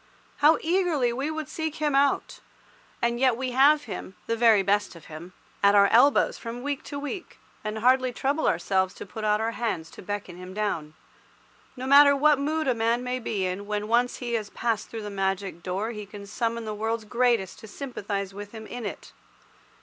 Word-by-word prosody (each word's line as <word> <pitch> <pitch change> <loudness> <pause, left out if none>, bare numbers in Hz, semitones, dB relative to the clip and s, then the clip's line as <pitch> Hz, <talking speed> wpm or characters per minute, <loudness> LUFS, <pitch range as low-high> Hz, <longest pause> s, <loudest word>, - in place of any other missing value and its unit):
How 300 +2 +5
eagerly 325 -8 +1
we 270 +5 -2
would 315 -2 -4
seek 315 -1 -4
him 300 -2 0
out! 275 +1 +1 0.6
And 235 0 +1
yet 255 -3 +3
we 255 0 -2
have 285 +4 +5
him—the 220 0 -5
very 225 -3 +5
best 205 -1 +1
of 165 - -13
him—at 180 +5 -2
our 200 -1 +7
elbows 265 +5 +4
from 235 +1 -6
week 285 -1 -2
to 285 - -6
week, 290 +6 -6 0.3
and 215 0 -3
hardly 255 +3 +3
trouble 280 +5 0
ourselves 190 +2 +1
to - - -8
put 215 +3 -8
out 210 0 +2
our 225 +1 -1
hands 220 -9 -3
to - - -11
beckon 200 -2 -5
him 180 +1 -9
down. 165 -8 -2 0.8
No 255 - -5
matter 280 +1 +7
what 295 0 +4
mood 310 +2 -1
a 255 - +3
man 230 +1 0
may 250 0 -2
be 210 -5 -2
in, 185 +2 -4
when 210 0 -2
once 240 +2 +2
he 240 -2 -4
has 215 -3 -2
passed 230 -3 -2
through 225 -2 -6
the 205 - -6
magic 195 -2 -2
door 190 +6 -3
he 210 -3 -7
can 205 0 -10
summon 230 +2 -2
the 215 - -3
world's 220 +1 -2
greatest 235 -4 +1
to 220 - -11
sympathize 200 -5 -5
with 205 +1 -9
him 220 -1 -8
in 235 -1 -5
it. - - -9
230 Hz, 195 wpm, -26 LUFS, 205-265 Hz, 0.8 s, our